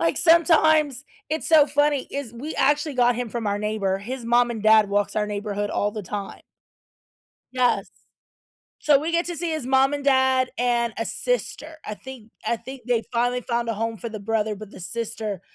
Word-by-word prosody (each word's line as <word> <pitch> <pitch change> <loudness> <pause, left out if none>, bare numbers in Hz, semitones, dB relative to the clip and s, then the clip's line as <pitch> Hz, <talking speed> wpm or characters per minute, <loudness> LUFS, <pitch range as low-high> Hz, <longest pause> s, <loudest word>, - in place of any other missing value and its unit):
like, 165 0 +1
sometimes, 315 -5 +4 0.2
it's 315 +1 -2
so 310 -3 +6
funny, 290 -1 +1
is 275 -5 -5
we 280 +7 -6
actually 295 +2 +1
got 245 -1 +3
him 245 -2 -3
from 230 -1 -4
our 205 0 0
neighbor. 205 -2 -1
His 240 +4 -6
mom 240 +1 +3
and 225 -3 -5
dad 215 -1 +5
walks 205 0 0
our 210 -1 0
neighborhood 205 0 -3
all 205 - 0
the 215 -1 -6
time. 200 +2 -6 1.1
Yes, 250 -1 +1 0.9
so 290 -2 +4
we 320 +3 -3
get 340 +1 +2
to 345 - -4
see 340 -1 -2
his 310 -4 -3
mom 270 +1 +3
and 285 -1 -5
dad 260 -1 +3
and 240 -2 +1
a 225 - -2
sister. 320 -10 -3
I 210 - -4
think 250 -2 -12 0.2
I 235 - +1
think 260 +1 -10
they 240 -2 +1
finally 245 +1 +1
found 235 -1 -2
a 230 - 0
home 225 +2 -3
for 235 - -6
the 215 -2 -7
brother, 215 0 -1
but 210 0 -10
the - - -12
sister, 215 -1 -4
240 Hz, 195 wpm, -24 LUFS, 215-280 Hz, 1.1 s, so